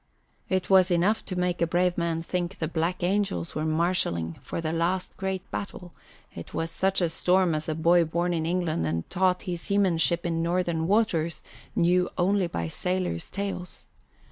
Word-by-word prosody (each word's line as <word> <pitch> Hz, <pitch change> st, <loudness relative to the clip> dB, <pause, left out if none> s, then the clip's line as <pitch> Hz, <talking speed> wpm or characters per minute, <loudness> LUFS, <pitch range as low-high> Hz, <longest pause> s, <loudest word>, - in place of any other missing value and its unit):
It 185 Hz, -1 st, 0 dB
was 190 Hz, -1 st, +5 dB
enough 185 Hz, +5 st, +2 dB
to 185 Hz, -, -5 dB
make 180 Hz, -1 st, -1 dB
a 170 Hz, -, +3 dB
brave 175 Hz, +1 st, +2 dB
man 165 Hz, -1 st, -1 dB
think 175 Hz, +1 st, -3 dB
the 160 Hz, -, -2 dB
black 170 Hz, +3 st, -1 dB
angels 185 Hz, -, 0 dB
were 155 Hz, -, -2 dB
marshalling 155 Hz, -, 0 dB
for -, -, -5 dB
the 160 Hz, -1 st, -2 dB
last 175 Hz, +3 st, -1 dB
great 190 Hz, -1 st, -3 dB
battle; 180 Hz, -3 st, -6 dB, 0.4 s
it 85 Hz, -, -9 dB
was 165 Hz, 0 st, -2 dB
such 190 Hz, +2 st, +1 dB
a 170 Hz, -, +2 dB
storm 180 Hz, +1 st, +2 dB
as 155 Hz, +1 st, -2 dB
a 155 Hz, -, -1 dB
boy 170 Hz, +2 st, +4 dB
born 170 Hz, +2 st, 0 dB
in 160 Hz, -1 st, -1 dB
England 165 Hz, -, 0 dB
and 80 Hz, +1 st, -2 dB
taught 185 Hz, 0 st, +2 dB
his 175 Hz, -2 st, -4 dB
seamanship 180 Hz, -4 st, +1 dB
in 165 Hz, -1 st, 0 dB
northern 170 Hz, -1 st, 0 dB
waters 180 Hz, -6 st, +1 dB, 0.3 s
knew 180 Hz, +1 st, +3 dB
only 190 Hz, +1 st, +2 dB
by 85 Hz, -, -3 dB
sailors' 180 Hz, -, -2 dB
tales. 195 Hz, -2 st, -5 dB
175 Hz, 175 wpm, -27 LUFS, 165-185 Hz, 0.4 s, was